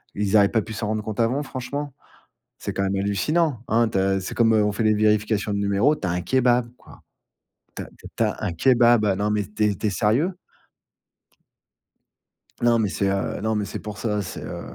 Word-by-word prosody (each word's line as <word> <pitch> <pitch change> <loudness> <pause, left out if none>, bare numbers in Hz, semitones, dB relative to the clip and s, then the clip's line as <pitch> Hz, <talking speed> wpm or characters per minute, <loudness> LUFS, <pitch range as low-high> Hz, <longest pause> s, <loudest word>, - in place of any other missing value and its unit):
Ils 105 +1 0
auraient 100 -1 +6
pas 110 - +1
pu 110 - -8
s'en 105 0 -3
rendre 110 0 -2
compte 110 +1 -6
avant 125 +6 +1
franchement? 135 +2 -5 0.7
C'est - - -5
quand 95 - -2
même 95 0 0
hallucinant, 115 - 0
hein? 115 +1 +3
Tu 105 - -4
as 95 0 +1
c'est 95 - -6
comme, 115 -1 +3
heu, 105 -1 +3
on 105 - 0
fait 110 - -2
les 110 0 +3
vérifications 105 0 +1
de 100 - -1
numéros. 100 +9 +2
Tu 100 - -5
as - - -1
un 90 0 -2
kebab, 125 +3 +2
quoi. - - -17 0.7
Tu - - -5
as - - -6
tu - - -18
as - - -8
tu 115 - +2
as 105 0 -2
un 95 - -1
kebab, 120 +3 +4
non, 105 +1 0
mais 105 -1 0
tu 105 +2 -3
es - - -4
tu 105 - -2
es - - +2
sérieux? 120 - +1 2.3
Non, 120 -1 +4
mais 105 -3 0
c'est 100 - -1
heu, 100 0 -2
non, 110 0 0
mais 105 - 0
c'est 100 - -6
pour 105 -1 -8
ça, 105 -3 -1
c'est, 90 - -7
heu, - - -6
105 Hz, 230 wpm, -23 LUFS, 100-120 Hz, 2.3 s, auraient